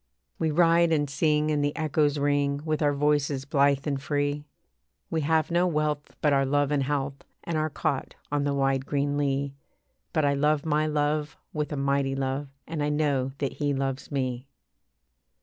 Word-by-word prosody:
We 160 - +1
ride 170 +1 +4
and 145 -2 +2
sing, 150 +1 +1
and 145 -1 +1
the 145 0 0
echoes 150 -2 +1
ring 145 0 +1
With 155 -1 -1
our 145 -1 +2
voices 145 -1 +1
blithe 140 -1 +2
and 140 -3 -1
free, 145 0 -1 0.7
We 160 - 0
have 160 +2 +1
no 175 +1 +3
wealth 150 -3 -1
but 150 -2 +3
our 135 0 +3
love 145 +1 +1
and 145 -1 +2
health, 140 0 -2 0.2
And 170 - -3
our 155 0 +1
cot 140 -2 -2 0.2
on 145 -1 +1
the 140 0 0
wide 135 -1 +1
green 145 0 0
lea; 140 -1 0 0.6
But 155 -4 +1
I 140 - +3
love 150 +1 +1
my 155 0 +2
love 150 0 0 0.2
with 150 0 -2
a 145 - -2
mighty 140 0 +1
love, 135 +1 -2 0.2
And 160 -1 -4
I 145 - +1
know 140 -3 0
that 140 - -2
he 145 -2 0
loves 135 +1 -3
me. 130 -2 -2
145 Hz, 185 wpm, -27 LUFS, 140-150 Hz, 0.7 s, ride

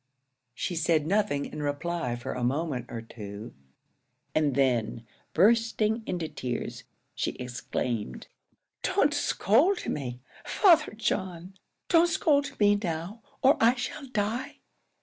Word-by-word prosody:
She 175 - -3
said 160 -2 +2
nothing 195 -5 +1
in 150 - -6
reply 145 -2 -2
for 120 - -5
a 125 - -4
moment 135 0 -1
or 115 -1 -6
two; 105 0 -9 0.8
and 150 -4 +2
then, 120 -4 +1 0.3
bursting 225 +3 +3
into 175 -3 -2
tears, 120 -3 -5 0.3
she - - -2
exclaimed, 120 - -4 0.6
"Don't - - +2
scold 295 - +2
me, 125 -4 -3 0.2
Father 335 - +4
John! 190 -4 -3 0.3
don't 340 0 +5
scold 285 -4 +1
me 205 -1 +4
now, 175 +4 -4 0.2
or 270 +2 +6
I 235 +2 +6
shall 265 +3 -5
die! 225 0 -2
170 Hz, 120 wpm, -28 LUFS, -, 0.8 s, or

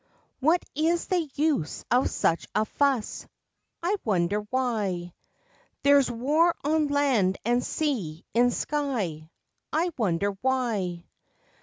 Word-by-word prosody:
What 320 +6 +2
is 330 +3 +1
the 345 -5 0
use 295 - 0
of 250 +2 +3
such 165 - 0
a 215 - +2
fuss? 270 -3 0 0.6
I 385 +4 +1
wonder 195 -1 +1
why! 210 -9 -1 0.7
There's 280 -2 +5
war 295 +9 +2
on 305 +1 +2
land 265 -10 +2
and 240 +1 +2
sea, 205 - -2
in 245 +1 +4
sky, 235 - -2 0.4
I 335 +3 +1
wonder 200 -1 +1
why! 220 -10 -1
250 Hz, 115 wpm, -27 LUFS, 200-295 Hz, 0.7 s, There's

